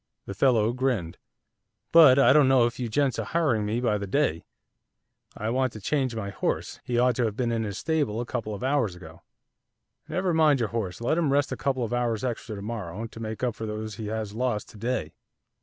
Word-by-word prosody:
The 100 - -6
fellow 115 0 +3
grinned. 125 -10 -1 0.7
'But 155 -6 +8
I 130 -2 +6
don't 150 -2 +5
know 130 -2 +5
if 120 +2 -3
you 120 -2 -2
gents 140 +2 +1
are - - -1
hiring 135 -11 0
me 110 +3 -1
by 110 -4 +1
the 100 - -5
day, 95 - 0 0.9
I 110 +2 -2
want 130 -1 0
to 110 - -8
change 130 +2 -1
my 100 -3 -4
horse; - - -3
he 120 - -2
ought 125 0 +3
to 125 - +2
have 105 -2 -3
been 120 -2 0
in 115 -1 0
his 100 -2 -4
stable 145 -9 -1
a 120 - -2
couple 115 -3 -4
of 100 - -8
hours 130 -8 +1
ago.' 80 -3 -13 0.9
'Never 185 -1 -1
mind 155 -4 +4
your 115 -3 0
horse, 110 -4 -4
let 140 +8 +1
him 155 -5 +1
rest 140 0 +2
a - - -1
couple 130 -3 -1
of 115 - -3
hours 120 -2 0
extra 120 -3 -3
to 100 - -7
morrow 105 -2 -5
to 115 - -10
make 110 +1 -5
up 125 -2 +1
for 110 0 -6
those 105 -1 -5
he 110 - -5
has 110 -1 -4
lost 115 -2 -2
to - - -14
day. 115 -9 -2
120 Hz, 225 wpm, -26 LUFS, 105-130 Hz, 0.9 s, But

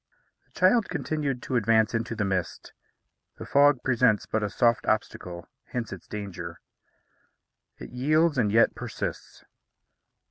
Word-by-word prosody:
The - - -16
child 195 +4 +4
continued 145 -5 -3
to 130 - -3
advance 110 -1 +3
into 115 0 -2
the 105 -2 -1
mist. 95 -4 -3 0.6
The - - -8
fog 140 -3 +4
presents 120 -5 +2
but 110 - -1
a 105 - -1
soft 115 -2 +1
obstacle; 90 -5 -2 0.2
hence 120 -5 -5
its 90 - -11
danger. 90 -5 -7 1.2
It - - -10
yields, 150 +4 +2
and 105 -4 +2
yet 115 +2 +4
persists. - - -6
115 Hz, 135 wpm, -26 LUFS, 105-130 Hz, 1.2 s, child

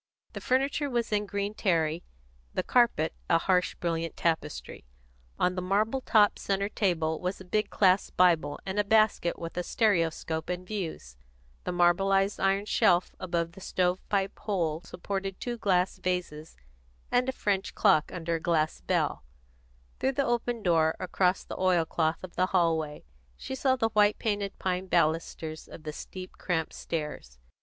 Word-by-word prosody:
The - - -6
furniture 275 +3 +1
was 235 -3 -1
in 210 0 0
green 200 +1 -2
terry, 165 -5 0 0.5
the - - 0
carpet 235 -11 +2 0.2
a 165 - +5
harsh, 180 +1 +1
brilliant 165 -1 -3
tapestry; 160 -3 -2 0.5
on 180 - +2
the 185 - -3
marble 215 +8 +1
topped 210 -4 +4
centre 200 0 -1
table 165 -7 0
was 180 +1 -3
a 190 - -11
big 210 +3 0
clasp 190 -1 +2
Bible 165 -5 +3
and 195 +1 -2
a - - +4
basket 215 -4 +2
with 165 0 -7
a - - +1
stereoscope 165 -6 0
and 180 0 -3
views; 170 - -5 0.5
the - - -1
marbleised 195 +3 +2
iron 195 +1 +2
shelf 175 -3 +3
above 170 -2 -2
the 195 +3 -14
stove 180 0 0
pipe 195 -1 -1
hole 170 -7 -1
supported 195 +2 -5
two 240 -1 -4
glass 185 -3 +1
vases 175 -4 -3 0.5
and 250 +1 +2
a - - +2
French 200 -6 -1
clock 185 -8 +3
under 170 -1 -3
a 165 - 0
glass 160 - 0
bell; - - 0 0.8
through 265 - +1
the 275 0 +1
open 240 -1 -1
door, 160 -3 +3
across 185 0 +1
the - - -8
oil 180 -3 +3
cloth 160 +1 -1
of 185 - -9
the 185 +1 +2
hallway, 165 -5 0 0.3
she - - -6
saw 265 0 +2
the 225 -3 +1
white 210 -1 +3
painted 205 -2 -2
pine 185 0 -2
balusters 160 -2 0
of 155 - -11
the 155 -1 -5
steep, 185 +4 -8
cramped 160 -3 -1
stairs. 150 - -5
185 Hz, 165 wpm, -28 LUFS, 165-205 Hz, 0.8 s, a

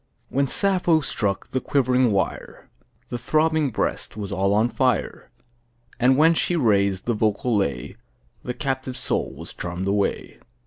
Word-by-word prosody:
1 - - -14
When 140 0 +2
Sappho 180 -2 +2
struck 100 -8 -2
the 130 - -2
quivering 130 -3 +2
wire, 100 -1 -3 0.4
The 120 - -4
throbbing 155 +1 +1
breast 110 - -3
was 105 -2 -5
all 100 0 +1
on 110 +3 +3
fire; 125 -2 -1 0.7
And 130 +2 +4
when 160 +3 +5
she 175 +2 0
raised 100 - +2
the 120 - +1
vocal 110 +2 0
lay, 95 -9 -2 0.5
The 125 - -4
captive 130 -1 -3
soul 125 - -1
was - - -7
charm'd 90 +1 -5
away! 100 0 -1
125 Hz, 150 wpm, -23 LUFS, 100-140 Hz, 0.7 s, when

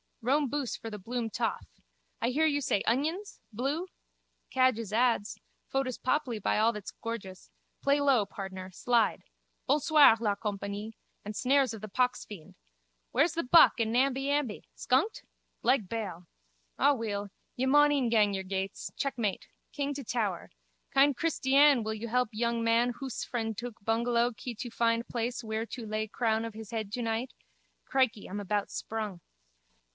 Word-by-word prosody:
Rome 275 +3 +2
boose 280 -3 -2
for 225 - -7
the 210 - -5
Bloom 230 +3 -3
toff. - - -2 0.5
I 235 - +2
hear 300 +5 +2
you 290 -2 +2
say 205 - +1
onions? 320 - -1
Bloo? 275 - -2 0.6
Cadges 255 -5 +2
ads. 230 -3 +1 0.3
Photo's 270 -2 -1
papli, 255 -4 0
by - - +1
all 225 +2 +4
that's 210 -3 -7
gorgeous. 205 -5 -7 0.3
Play 280 +1 +3
low, 270 -7 +3
pardner. 190 -1 -7
Slide. 235 +4 +1 0.4
Bonsoir 290 -3 +6
la 210 -3 +1
compagnie. 205 +1 -4 0.3
And 210 +1 -5
snares 265 +1 +2
of 220 - -8
the 215 - -6
poxfiend. 210 -6 -2 0.6
Where's 290 +7 +3
the 335 - -1
buck 285 +1 +6
and 225 -1 +1
Namby 270 +3 +1
Amby? 285 -7 -1
Skunked? 280 - +1 0.4
Leg 240 -5 +3
bail. 185 -7 -5 0.5
Aweel, 215 -7 +1 0.3
ye 255 - 0
maun 295 +2 +5
e'en 270 -5 +1
gang 210 -3 +3
yer 190 -1 -2
gates. 190 +1 -4
Checkmate. 235 -8 -2 0.2
King 285 0 -2
to 280 - -5
tower. 215 -7 -2 0.4
Kind 275 +1 +4
Kristyann 280 -4 +4
wil 220 0 -2
yu 220 +2 -5
help 250 0 +1
yung 235 +1 -1
man 230 +2 +3
hoose 265 -4 -4
frend 225 -3 -3
tuk 240 0 -5
bungellow 235 +2 +1
kee 240 +2 -6
tu 240 +3 -6
find 230 0 +1
plais 240 +1 -3
whear 220 0 -2
tu 235 0 -7
lay 215 0 -2
crown 220 0 0
of 230 - -6
his 220 -2 -9
hed 220 -3 -3
2 240 +2 -3
night. 230 +3 -2 0.5
Crickey, 255 -6 +1
I'm 200 +2 -5
about 205 0 -1
sprung. 215 -5 -4
235 Hz, 160 wpm, -30 LUFS, 215-265 Hz, 0.6 s, Bonsoir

